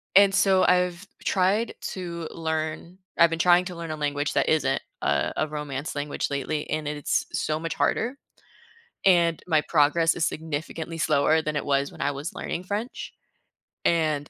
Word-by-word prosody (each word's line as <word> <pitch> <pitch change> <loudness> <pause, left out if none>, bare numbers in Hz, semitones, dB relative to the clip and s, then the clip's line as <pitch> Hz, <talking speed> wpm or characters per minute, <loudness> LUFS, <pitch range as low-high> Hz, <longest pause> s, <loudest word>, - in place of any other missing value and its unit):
and 195 0 +7
so, 190 -1 +4
I've 180 +1 +2 0.2
tried 200 +4 +1 0.2
to 170 -4 -5
learn 160 +2 -3 0.2
I've 170 - +6
been 165 - -2
trying 175 +1 +5
to 180 -1 -6
learn 165 -1 -6
a 155 - -2
language 145 0 -1
that - - +2
isn't, 135 -4 +2 0.2
uh, 70 -1 +1
a - - +1
romance 150 -1 -4
language 145 0 -2
lately, 150 +2 -2
and 155 0 -2
it 150 - -2
it's 145 - 0
so 155 0 -1
much 165 0 -3
harder, 250 +5 0 0.9
and 170 -3 +4
my 155 -3 +3
progress 165 +2 +3
is 165 - 0
significantly 160 +1 -4
slower 155 +1 +3
than 155 -1 -3
it - - -1
was 140 0 +1
when - - -14
I 145 - +2
was 145 +5 -5
learning 175 - -4
French. 210 +6 -4 0.7
And 155 -4 +1
160 Hz, 170 wpm, -25 LUFS, 150-175 Hz, 0.9 s, and